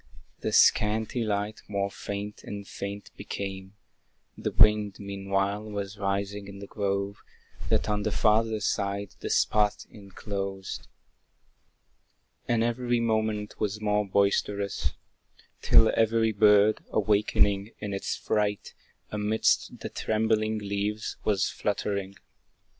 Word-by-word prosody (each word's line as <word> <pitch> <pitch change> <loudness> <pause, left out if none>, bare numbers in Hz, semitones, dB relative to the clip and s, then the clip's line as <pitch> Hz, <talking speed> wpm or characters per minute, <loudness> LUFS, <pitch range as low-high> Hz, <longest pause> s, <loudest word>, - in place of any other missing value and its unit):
The - - -2
scanty 110 +3 +3
light 105 0 -2
more 100 -1 -1
faint 100 +1 -6
and 100 -1 -7
faint 100 0 -6
became; 95 0 -6 0.6
The - - -3
wind, 105 -2 +4
meanwhile, 100 0 -1
was 100 0 -5
rising 100 0 -2
in 100 0 -9
the 100 - -8
grove, 100 0 -2 0.5
That - - +2
on 105 0 0
the 110 - 0
farther 110 0 +2
side 100 -1 -1
the - - -4
spot 105 -1 +2
enclosed; 100 -1 -6 1.6
And, 115 -1 +2
every 120 +1 0
moment, 110 -2 -1
was 105 0 -1
more 105 -1 +1
boisterous; 100 -4 +1 0.7
Till 110 - +6
every 115 0 +3
bird, 105 0 +5
awaking 100 -1 +2
in 105 -1 -5
its 95 - -2
fright, 105 -1 -1 0.4
Amidst 105 +1 +1
the - - -4
trembling 110 0 0
leaves 105 +1 -3
was 100 -3 +2
fluttering. 100 -1 -2
105 Hz, 115 wpm, -28 LUFS, 100-110 Hz, 1.6 s, Till